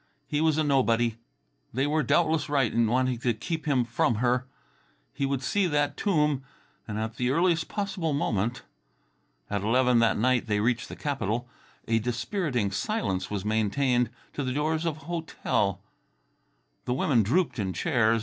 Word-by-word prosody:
He 150 0 -1
was 160 -1 +3
a 155 - +2
nobody. 120 -5 +2 0.5
They 130 +4 0
were 155 +2 +1
doubtless 155 +2 +2
right 135 -6 +2
in 115 -1 +3
wanting 130 +1 +1
to 120 -2 0
keep 160 +8 -4
him 130 -4 +2
from 120 0 +1
her. 125 +3 +1 0.7
Yet - - -28
he 140 - +2
would 135 -1 -2
see 200 +7 +1
that 145 -2 +1
tomb, 150 -8 +1 0.5
and 105 -1 -4
at 110 +1 -3
the 125 0 0
earliest 170 +3 +2
possible 195 -5 -2
moment. 120 -4 -1 0.8
At 100 - -2
eleven 125 +3 +3
that 115 -1 +3
night 125 +2 +2
they 105 -1 +1
reached 120 +2 0
the - - -7
capital. 120 -4 -2 0.4
A 115 0 +2
dispiriting 125 - -1
silence 100 - -2
was 100 -1 -3
maintained 115 +3 +1 0.2
to 145 - -3
the 130 -1 -2
doors 155 +3 0
of 155 -2 -2
a - - -14
hotel. 140 - -1 1.0
The 125 - 0
women 130 -4 +3
drooped 130 - +1
in 95 -2 -1
chairs. 115 - +2
125 Hz, 170 wpm, -27 LUFS, 115-150 Hz, 1.0 s, was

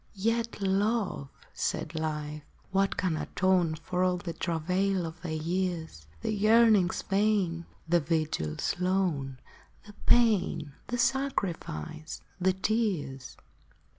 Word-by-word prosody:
" - - -33 0.2
Yet, 230 -1 -2
Love," 195 -5 0 0.2
said - - -2
Life, 150 -1 -3 0.2
" - - -32
what 195 +1 +1
can 180 -3 +1
atone 180 0 +1
For 180 +3 -2
all 180 -1 +2
the 175 -1 -5
travail 180 +3 0
of 165 +1 -8
thy 175 - -5
years 160 - -2
— 80 - -26
The - - 0
yearnings 215 -3 +4
vain, 195 -4 +1 0.2
the 175 +1 +4
vigils 155 - -1
lone, 180 -8 0 0.5
The 210 - -12
pain, 205 -11 +3
the 245 - -2
sacrifice, 175 - -2 0.2
the 185 +1 +3
tears 190 - -1
180 Hz, 125 wpm, -29 LUFS, 155-200 Hz, 0.5 s, yearnings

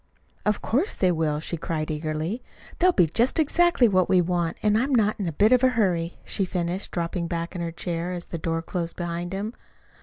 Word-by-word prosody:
"Of 210 - +1
course 285 - 0
they 185 -2 +3
will," 155 -3 0
she 170 +2 -4
cried 155 -1 -3
eagerly. 155 +8 -3 0.4
"They'll 365 +1 +5
be 180 - +4
just 235 - +1
exactly 325 -3 +4
what 185 -4 +2
we 185 - +5
want, 175 -1 0
and 210 0 +3
I'm 260 +4 +2
not 215 -2 +2
in 195 - -2
a - - -1
bit 205 +9 +3
of 255 0 +5
a 260 - +6
hurry," 175 -5 +1
she 195 - 0
finished, 180 0 -2
dropping 170 0 -2
back 170 0 -3
in 175 - -4
her 170 -1 -3
chair 170 +1 -3
as 175 -1 -5
the 170 - -6
door 165 +1 -2
closed 170 -2 -3
behind 175 0 -4
him. 205 +4 -3
175 Hz, 215 wpm, -25 LUFS, 165-210 Hz, 0.4 s, a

